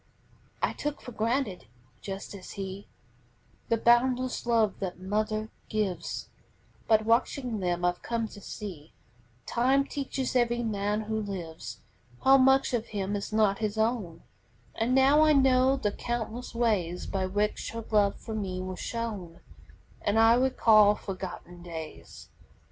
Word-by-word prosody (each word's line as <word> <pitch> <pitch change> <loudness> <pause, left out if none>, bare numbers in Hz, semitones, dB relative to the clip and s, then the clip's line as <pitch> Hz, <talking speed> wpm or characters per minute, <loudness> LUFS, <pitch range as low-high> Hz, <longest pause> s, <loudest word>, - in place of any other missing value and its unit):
] - - -22
I - - -5
took 295 0 -4
for 250 - -9
granted, 230 -3 -1 0.3
just 195 +1 -6
as 195 -2 -9
he, 195 0 -6 0.8
The 230 - +3
boundless 245 +2 +2
love 225 -4 +2
that 185 -2 -4
mother 215 +3 -2 0.2
gives, 195 -6 -2 0.6
But 220 -1 +4
watching 235 0 +1
them 175 -1 -1
I've 175 0 0
come 230 -1 -2
to 205 - -12
see 175 -7 -8 0.5
Time 265 +3 +2
teaches 270 -2 -3
every 240 -1 +2
man 210 -1 -1
who 220 0 -2
lives 165 - -6 0.4
How 270 +1 +7
much 265 0 +4
of 235 -1 -1
him 200 -1 -2
is 200 - -4
not 215 -2 +2
his 215 -1 -2
own; 220 -7 -1 0.5
And 235 +3 0
now 275 +3 +6
I 310 0 +6
know 265 -1 +4
the 210 -6 0
countless 240 +2 -4
ways 200 -7 0
By 190 -1 -2
which 205 +2 -1
her 230 -1 -5
love 205 -2 +3
for 220 - -7
me 195 -4 -3
was 185 0 -5
shown, 205 -8 -5 0.6
And 205 +2 +1
I 225 +1 +7
recall 225 -5 +5
forgotten 185 -3 -7
days. 160 -3 -9
215 Hz, 145 wpm, -28 LUFS, 195-240 Hz, 0.8 s, How